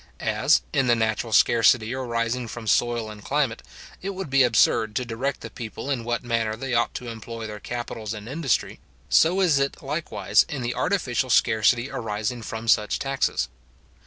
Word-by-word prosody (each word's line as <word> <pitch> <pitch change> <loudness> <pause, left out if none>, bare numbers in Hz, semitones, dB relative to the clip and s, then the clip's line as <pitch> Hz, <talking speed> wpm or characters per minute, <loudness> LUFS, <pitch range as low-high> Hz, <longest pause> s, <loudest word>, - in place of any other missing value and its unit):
As, - - +2
in 130 - +2
the 120 - +5
natural 110 0 -1
scarcity 115 +1 +4
arising 120 -1 -2
from 115 0 -7
soil 115 0 +1
and 105 -1 -11
climate, 140 -5 0 0.4
it 195 +1 -4
would 185 -7 -6
be 135 0 +5
absurd 110 -2 +3
to 125 - -1
direct 125 +4 -3
the - - -8
people 120 +4 -6
in 125 -4 -1
what 120 +1 -2
manner 115 -2 -1
they 130 +2 -4
ought 120 0 +1
to 125 - -6
employ 115 0 -7
their 105 -1 -7
capitals 115 -2 -5
and 105 0 -9
industry, 135 -1 -1 0.3
so 180 +4 +4
is 160 -7 +4
it 140 +1 -2
likewise 105 - +1
in 140 -4 -4
the 120 +1 -1
artificial 130 -10 0
scarcity 120 +2 +3
arising 115 -2 -3
from 110 +1 -6
such 105 -1 +3
taxes. 135 - -1
120 Hz, 175 wpm, -24 LUFS, 110-135 Hz, 0.4 s, the